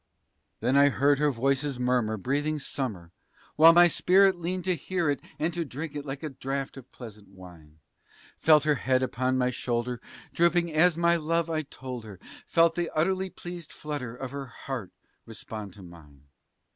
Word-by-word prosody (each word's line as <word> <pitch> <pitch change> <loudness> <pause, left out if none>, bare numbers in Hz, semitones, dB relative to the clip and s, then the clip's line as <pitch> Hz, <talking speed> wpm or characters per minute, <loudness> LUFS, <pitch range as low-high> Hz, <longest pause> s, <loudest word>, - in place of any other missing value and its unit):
Then 125 +4 +1
I 140 0 +6
heard 140 +1 +2
her 150 0 +3
voice's 135 +2 0
murmur 125 -3 0
breathing 145 +8 -1
summer, 110 - -5 0.4
while 160 +2 +8
my 175 +1 +7
spirit 190 +3 +4
Leaned 180 +1 -4
to 185 +1 +1
hear 170 0 -1
it 140 - -3 0.2
and 160 +3 -1
to 170 0 -2
drink 150 +2 -7
it 145 0 -6
like 135 +2 -6
a 155 - -3
draught 135 0 -4
of 130 -2 -13
pleasant 105 -4 -11
wine; 90 -5 -15 0.6
Felt 155 -2 +5
her 150 0 +3
head 130 -1 +1
upon 130 +1 0
my 125 0 +1
shoulder 120 0 -3 0.3
drooping 170 -1 +2
as 165 +2 +4
my 170 0 +3
love 165 +1 -1
I 155 -1 0
told 130 -4 -8
her; 100 -4 -11 0.3
Felt 165 -1 +4
the 170 0 -2
utterly 190 +4 +1
pleased 175 -3 -9
flutter 145 -6 -6
of 130 0 -7
her 140 -1 -6
heart 120 -4 -7 0.4
respond 110 -3 -8
to 100 - -13
mine. 75 -5 -15
140 Hz, 175 wpm, -27 LUFS, 120-165 Hz, 0.6 s, while